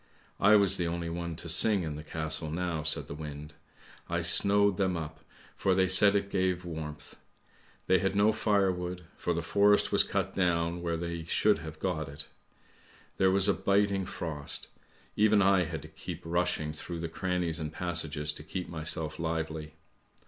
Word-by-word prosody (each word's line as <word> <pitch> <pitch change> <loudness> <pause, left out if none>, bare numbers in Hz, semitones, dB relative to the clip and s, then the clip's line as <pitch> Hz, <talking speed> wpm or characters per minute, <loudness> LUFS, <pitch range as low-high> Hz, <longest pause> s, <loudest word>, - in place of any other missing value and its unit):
I 105 +2 +6
was 100 -3 +4
the 85 - -1
only 85 0 -3
one 85 -1 -4
to 85 - -8
sing 95 +3 +4
in 80 -2 -4
the 75 - -7
castle 80 0 -1
now," 85 0 -2
said 80 +1 0
the - - -6
wind. 75 0 -8 0.3
" - - -23
I - - -1
snowed 100 -1 +4
them 95 -3 0
up, 80 -1 -7 0.3
for 95 - +1
they 95 0 +3
said 100 +2 +5
it 100 0 -1
gave 90 -1 0
warmth. 80 -3 -8 0.7
They 95 0 +3
had 95 +2 -1
no 105 +2 +4
firewood, 95 -5 0
for 85 - -2
the 85 - -2
forest 100 +4 +3
was - - +5
cut - - -2
down 85 -2 0
where 85 -1 -2
they 85 0 -4
should - - +2
have - - -8
got 80 -2 -3
it. 70 +2 -8 0.9
There 95 - +4
was 95 0 +6
a - - +4
biting 100 -1 +1
frost. 80 -7 -3 0.5
Even 105 0 +4
I 95 -2 +4
had 80 -3 -6
to - - -10
keep - - -8
rushing 85 -3 -1
through 85 +2 -7
the 85 - -3
crannies 90 0 -2
and 75 -1 -4
passages 80 -3 -2
to 75 - -9
keep 90 +4 -5
myself 80 -1 -2
lively. 80 -2 -4
85 Hz, 180 wpm, -29 LUFS, 80-95 Hz, 0.9 s, I